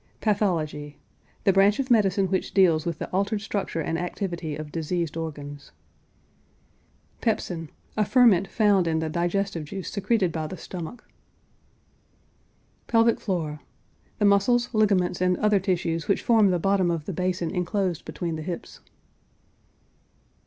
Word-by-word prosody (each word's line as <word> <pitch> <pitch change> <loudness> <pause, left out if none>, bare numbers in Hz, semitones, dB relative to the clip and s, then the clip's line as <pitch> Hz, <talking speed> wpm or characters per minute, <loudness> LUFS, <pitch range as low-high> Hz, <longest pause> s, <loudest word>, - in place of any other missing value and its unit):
PATHOLOGY. 160 -9 -1 0.5
The 195 - +4
branch 195 +2 +4
of 265 -2 -2
medicine 200 -4 +3
which 190 - -2
deals 170 -5 +4
with 165 -2 -2
the - - -5
altered 200 +3 0
structure 200 -6 -3
and 165 +2 -2
activity 175 -3 -4
of 155 0 -7
diseased 165 0 -2
organs. 145 -3 -6 1.5
PEPSIN. 175 -8 -2 0.3
A 215 - +2
ferment 210 -5 +4
found 205 -5 +3
in 160 -1 +1
the 160 0 -1
digestive 175 0 -1
juice 190 +4 -6
secreted 200 -3 +1
by 160 -1 -3
the 185 - -7
stomach. 175 +7 -8 1.8
PELVIC 230 0 +3
FLOOR. 160 -7 -3 0.6
The 205 - +1
muscles, 235 +5 +3
ligaments, 195 -5 +2
and 180 -1 +2
other 210 -1 +3
tissues 175 -3 -1
which 200 - +1
form 220 -4 +5
the 180 - +2
bottom 190 0 +2
of 165 -3 -2
the 195 - -4
basin 180 -1 -1
inclosed 180 -1 -1
between 165 +1 -4
the - - -5
hips. 170 +1 -6
180 Hz, 140 wpm, -25 LUFS, 165-200 Hz, 1.8 s, form